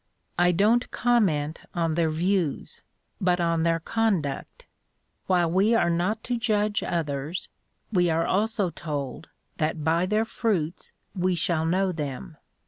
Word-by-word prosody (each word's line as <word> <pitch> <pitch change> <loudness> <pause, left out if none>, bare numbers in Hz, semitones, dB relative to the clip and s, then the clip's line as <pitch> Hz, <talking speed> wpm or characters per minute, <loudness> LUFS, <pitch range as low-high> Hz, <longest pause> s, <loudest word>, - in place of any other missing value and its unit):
"I 175 0 +5
don't 215 +7 +3
comment 170 -11 +1
on 165 -2 0
their 165 0 +1
views, 175 0 -1 0.4
but 180 -1 +2
on 170 -1 +1
their 165 0 +2
conduct. 185 -8 -1 0.6
While 175 -3 +2
we 200 +6 +3
are 175 -6 +3
not 185 +6 0
to 240 -1 -2
judge 210 -3 +1
others, 150 0 -3 0.4
we 180 -4 +3
are 165 +1 +1
also 210 -2 0
told 145 -5 -5 0.3
that 155 0 -1
by 165 +3 +2
their 215 +3 +1
fruits 185 -8 -2 0.2
we 185 -1 0
shall 160 -1 +1
know 185 +2 +1
them. 140 - -5
175 Hz, 135 wpm, -26 LUFS, 160-205 Hz, 0.6 s, I